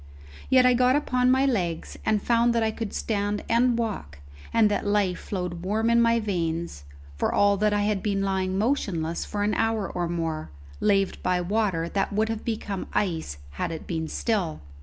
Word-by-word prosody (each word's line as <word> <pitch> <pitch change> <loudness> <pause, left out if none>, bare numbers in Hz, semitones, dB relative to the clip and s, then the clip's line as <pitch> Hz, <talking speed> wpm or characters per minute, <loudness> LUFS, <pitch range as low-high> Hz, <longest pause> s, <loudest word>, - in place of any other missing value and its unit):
Yet 255 -1 +6
I 250 - +6
got 250 +1 +4
upon 255 -4 +2
my 265 +1 +4
legs, 180 -11 -1
and 215 -2 +1
found 235 0 +3
that 230 - +2
I 220 - +1
could 220 -1 -5
stand 205 -1 -2
and 235 +1 +3
walk, 205 - -3 0.3
and 225 -2 +4
that - - 0
life 200 -3 +1
flowed 180 -3 -4
warm 220 +4 +1
in 235 0 +5
my 230 0 +3
veins, 170 - -3 0.3
for - - 0
all 205 0 +4
that 210 +1 +2
I 205 0 +1
had 205 -2 0
been 200 -2 0
lying 190 -1 -1
motionless 195 - -1
for 205 -1 -2
an 210 +1 +1
hour 225 -3 0
or 175 -1 -3
more, 165 - -3 0.3
laved 195 -2 +1
by 180 0 +1
water 185 -3 0
that 195 +3 -1
would 215 +2 +1
have 225 -1 -3
become 210 -4 -3
ice 160 - -1
had 70 - -3
it 160 - -6
been 160 -2 -3
still. 190 -5 -1
205 Hz, 190 wpm, -26 LUFS, 180-225 Hz, 0.3 s, Yet